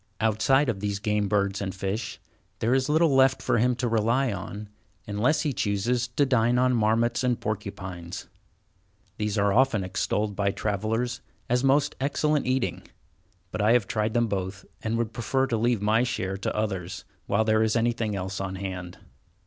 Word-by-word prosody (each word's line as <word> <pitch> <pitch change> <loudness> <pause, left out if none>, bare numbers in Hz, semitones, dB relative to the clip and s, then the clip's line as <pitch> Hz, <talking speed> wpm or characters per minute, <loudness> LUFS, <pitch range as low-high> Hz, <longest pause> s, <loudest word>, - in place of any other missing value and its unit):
Outside 110 +6 +3
of 115 -5 -1
these 100 0 -2
game 105 0 0
birds 100 -1 0
and 95 -1 -3
fish, 100 +2 -3 0.4
there 115 +4 +1
is 130 +1 +1
little 160 0 +4
left 135 0 +4
for - - +1
him 125 +2 +2
to 120 - -1
rely 115 +2 +1
on, 100 +2 -6 0.4
unless 120 +8 +1
he 150 -3 -1
chooses 115 +4 0
to 125 +4 +1
dine 125 -2 +2
on 125 0 +3
marmots 115 +2 +2
and 125 -2 +1
porcupines. 95 -3 -5 0.9
These 105 0 -1
are 100 -1 +3
often 125 -5 +3
extolled 100 +3 -1
by 100 0 +1
travellers 110 +5 -2 0.3
as 125 +2 +1
most 140 +1 +3
excellent 150 +1 +1
eating, 130 -1 0 0.7
but - - -2
I 105 +3 +4
have 120 -4 +3
tried 110 +2 -1
them 120 0 +3
both, 95 -2 -4 0.2
and 115 +1 -1
would 115 -1 -2
prefer 130 +3 0
to 120 - -1
leave 115 -1 +1
my 110 +2 +3
share 95 -6 -2
to 100 - -3
others, 95 -4 -3 0.2
while 105 +2 +2
there 110 0 +3
is 110 -1 +2
anything 115 -2 0
else 95 0 -4
on 95 -1 -4
hand. 95 -2 -6
110 Hz, 175 wpm, -26 LUFS, 100-125 Hz, 0.9 s, little